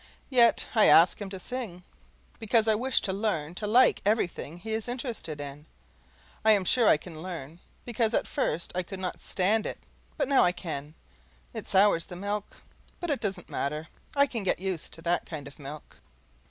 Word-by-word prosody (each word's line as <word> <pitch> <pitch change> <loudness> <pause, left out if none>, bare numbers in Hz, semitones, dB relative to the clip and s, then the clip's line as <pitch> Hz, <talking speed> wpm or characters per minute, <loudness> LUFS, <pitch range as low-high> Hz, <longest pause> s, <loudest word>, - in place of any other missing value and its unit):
Yet 235 -3 +5
I 220 -3 +5
ask 170 +5 +6
him 200 - -4
to 190 -1 -5
sing, 210 -6 -6 0.6
because 225 0 +3
I 220 - +5
wish 250 +4 +1
to 190 - -2
learn 185 -7 -1
to 210 +3 -4
like 245 +4 +5
everything 180 -6 -1
he 220 +5 -5
is 220 +1 0
interested 235 - -4
in. 145 +2 -8 0.8
I 220 0 +7
am 200 -3 +2
sure 235 +3 +4
I - - +6
can 160 0 -10
learn, 165 -3 -7 0.3
because 230 -1 0
at - - +1
first 175 - -2
I 180 - 0
could 190 +1 -8
not 185 -1 -4
stand 210 +4 +1
it, - - -5 0.4
but - - 0
now 275 -2 +5
I 180 - +3
can. 155 -4 -6 0.6
It - - -6
sours 190 -3 +4
the 180 - -8
milk, 205 +2 -5 0.4
but 345 -3 -2
it 285 - 0
doesn't 195 -5 -3
matter; 150 +3 -3 0.3
I 280 0 +5
can 240 -5 -4
get 190 - +1
used 185 -3 -4
to 165 - -10
that 175 0 0
kind 150 -4 -7
of 140 - -13
milk. 145 +1 -10
190 Hz, 195 wpm, -28 LUFS, 165-225 Hz, 0.8 s, I